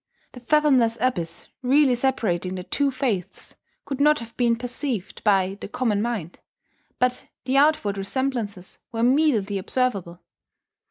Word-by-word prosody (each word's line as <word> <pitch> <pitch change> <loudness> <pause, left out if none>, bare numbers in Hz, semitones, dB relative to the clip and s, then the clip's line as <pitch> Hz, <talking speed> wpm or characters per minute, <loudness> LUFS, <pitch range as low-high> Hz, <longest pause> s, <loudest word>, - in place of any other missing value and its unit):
The 250 - -11
fathomless 255 -3 +3
abyss 170 -10 -2
really 265 +1 +4
separating 215 -8 0
the 180 - -5
two 280 +9 0
faiths 250 -9 -3 0.3
could 275 -1 -4
not 300 +1 +5
have 230 -1 -9
been 235 -2 +2
perceived 245 -3 -5
by 195 -1 +2
the - - -5
common 215 -2 0
mind; 215 -8 -3 0.6
but 250 0 0 0.2
the 265 +1 +1
outward 275 -9 +3
resemblances 205 -3 -3
were 225 -1 -3
immediately 240 -7 +2
observable. 190 -6 -2
235 Hz, 130 wpm, -24 LUFS, 195-265 Hz, 0.6 s, not